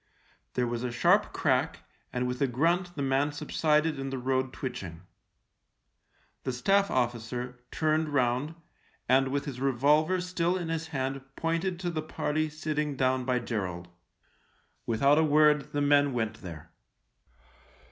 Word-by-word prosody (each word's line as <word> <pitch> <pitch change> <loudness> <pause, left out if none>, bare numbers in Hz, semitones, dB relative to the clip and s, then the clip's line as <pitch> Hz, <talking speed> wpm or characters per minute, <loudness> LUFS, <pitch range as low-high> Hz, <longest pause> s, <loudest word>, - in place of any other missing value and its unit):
There 125 - +1
was 120 0 -3
a 125 - -2
sharp 120 - +3
crack, - - 0 0.3
and 125 0 -1
with 125 +1 -4
a 140 - +4
grunt 170 +8 0
the 140 - -2
man 135 +2 +1
sub 145 - -8
sided 155 -1 +2
in 135 0 -3
the 135 - -3
road 130 +1 0
twitching. 95 -12 -6 1.4
The - - -1
Staff 195 +11 +2
officer, 125 0 -2
turned 155 0 +1
round, 130 +2 0 0.5
and 135 +1 +4
with 140 +1 -2
his 130 -3 -6
revolver 150 +7 +3
still 180 0 0
in 175 -3 -4
his 165 0 -2
hand 135 -3 -3
pointed 165 +2 -1
to 175 -1 -1
the 160 -2 -2
party 155 0 -1
sitting 150 -1 -2
down 130 -1 +1
by 125 -1 +1
Gerald. 95 -7 -4 1.0
Without 140 +6 +4
a - - +4
word 150 -1 +4
the 145 - -1
men 145 -1 +4
went 110 -3 -2
there. 85 -5 -9
140 Hz, 150 wpm, -29 LUFS, 125-155 Hz, 1.4 s, a